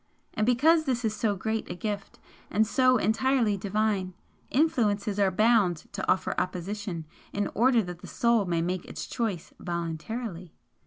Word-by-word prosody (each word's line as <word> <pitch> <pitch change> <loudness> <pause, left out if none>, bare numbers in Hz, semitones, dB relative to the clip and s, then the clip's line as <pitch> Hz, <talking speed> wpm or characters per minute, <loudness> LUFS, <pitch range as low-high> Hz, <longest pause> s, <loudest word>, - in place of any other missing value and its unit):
And 215 - 0
because 315 +7 +4
this 250 -3 0
is 215 -1 0
so 210 -1 0
great 220 +3 -3
a 175 - -4
gift, 205 +1 -4 0.3
and 215 +1 +3
so 255 +3 +4
entirely 230 -1 +2
Divine, 200 -2 -1 0.3
influences 210 -8 +1
are 200 -1 +4
bound 210 -3 +3 0.2
to 200 - 0
offer 190 - +1
opposition 185 -1 -4 0.3
in 205 0 -1
order 240 +1 +4
that 180 -2 -7
the - - -10
Soul 235 -3 +2
may 170 -2 0
make 180 +1 -2
its - - -6
choice 215 -9 -3
VOLUNTARILY. 170 +2 -4
210 Hz, 155 wpm, -28 LUFS, 185-235 Hz, 0.3 s, because